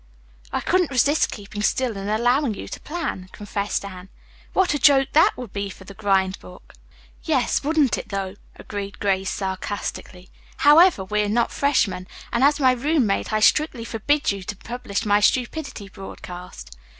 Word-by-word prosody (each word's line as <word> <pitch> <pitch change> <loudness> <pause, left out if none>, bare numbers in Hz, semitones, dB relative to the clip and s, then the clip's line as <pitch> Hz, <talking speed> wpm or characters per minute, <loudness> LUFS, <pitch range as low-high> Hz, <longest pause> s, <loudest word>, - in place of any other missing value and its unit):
"I - - -1
couldn't 360 -2 +2
resist 280 +3 +2
keeping 205 -1 -7
still 245 +1 0
and 195 +1 -5
allowing 245 +3 +2
you - - -7
to - - -7
plan," 300 - -5
confessed 205 -1 -3
Anne. 185 -1 -9 0.4
"What 375 -5 +2
a 290 - -1
joke 270 -2 +5
that 320 +2 +5
would 245 -5 -8
be 200 -1 -3
for 190 - -11
the 200 - -11
grind 195 -2 +1
book!" 180 - -15 0.5
"Yes, 280 -6 +1
wouldn't 295 -2 +2
it - - -9
though?" 195 -2 -3 0.2
agreed 200 -1 -7
Grace 195 -2 0
sarcastically. 190 -1 -5 0.3
"However, 305 - +6
we 210 +2 0
are 205 - -1
not 230 +2 +1
freshmen, 205 -10 +1 0.3
and 235 - +2
as 285 +1 +4
my 260 -2 +5
roommate 255 -6 0
I 215 0 +1
strictly 255 -1 +3
forbid 280 +6 0
you 200 -1 -5
to 195 +3 -6
publish 225 -1 -4
my 205 0 +4
stupidity 250 0 0
broadcast. 180 - -10
215 Hz, 165 wpm, -23 LUFS, 195-275 Hz, 0.5 s, However